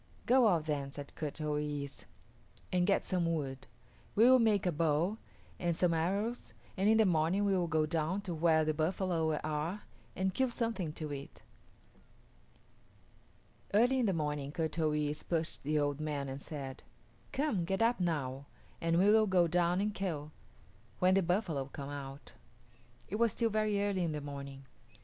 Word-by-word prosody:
"Go 250 -1 +5
out 170 -6 +2
then," 145 -3 -2
said 145 0 -9
Kut 150 -1 -5
o 150 -1 -1
yis´, 145 -2 -4 0.7
"and 180 0 +2
get 200 - +3
some 175 -2 0
wood. 135 -5 -3 0.5
We 220 - +5
will 260 0 +7
make 215 -4 +3
a 180 - +2
bow 165 +6 +1 0.4
and 170 -1 0
some 175 -2 +3
arrows, 200 +9 -1 0.2
and 195 +2 +2
in 220 - +5
the 220 - +5
morning 175 +3 +2
we 195 -1 +2
will 175 -2 +1
go 160 -1 +2
down 165 +4 -1
to 190 -4 -5
where 160 -1 +3
the 155 - +1
buffalo 160 0 0
are 155 +6 -2 0.3
and 190 0 0
kill 260 +5 +1
something 225 -9 -2
to 155 -2 -5
eat." 140 0 -9 2.3
Early 245 +5 +4
in 240 - +2
the - - +3
morning 150 -3 -2
Kut 160 0 -2
o 155 -1 +3
yis´ 150 0 -1
pushed 165 -2 -1
the 150 +2 0
old 145 -1 0
man 150 -2 -2
and 135 +1 -6
said, 135 -4 -7 0.5
"Come, 270 - 0
get 195 +6 0
up 235 0 +2
now, 140 -6 -2 0.3
and 165 0 +2
we 190 +3 +4
will 220 0 +5
go 180 -3 +4
down 175 +1 +2
and 210 +1 0
kill, 160 -7 -3 0.7
when 185 +1 +4
the 195 - +4
buffalo 175 -6 0
come 140 +1 -7
out." 140 0 -8 0.7
It 210 - -3
was 230 -2 +2
still 230 -2 0
very 215 -1 +1
early 200 -3 0
in 165 -2 -1
the 150 - -3
morning. 140 -1 -7
165 Hz, 175 wpm, -33 LUFS, 150-195 Hz, 2.3 s, will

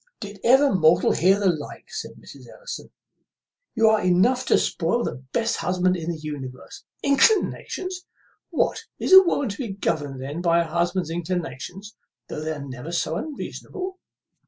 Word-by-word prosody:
"Did 205 -1 -8
ever 265 +2 +5
mortal 170 -1 +4
hear 190 +3 +3
the 205 - -1
like?" 160 -6 -2
said - - -6
Mrs. - - -14
Ellison; - - -8 0.9
"you 225 -1 +4
are 220 0 +4
enough 190 +9 +2
to - - +5
spoil 185 +8 0
the 125 +2 -5
best 230 -1 0
husband 185 0 +1
in 170 -1 -4
the 170 - -2
universe. 145 -4 -8 0.2
Inclinations! 370 +3 +1 0.4
what, - - 0
is - - 0
a 380 - +12
woman 285 - 0
to 200 - -6
be 230 -7 -3
governed 145 -8 -2
then 145 +6 -5
by 170 -1 +3
her 165 - -9
husband's 175 0 0
inclinations, 180 +3 -5 0.3
though 150 - -5
they 155 +1 -3
are 140 -2 -7
never 130 +5 -7
so 165 -2 -1
unreasonable?" 370 - -6
180 Hz, 160 wpm, -24 LUFS, 160-235 Hz, 0.9 s, a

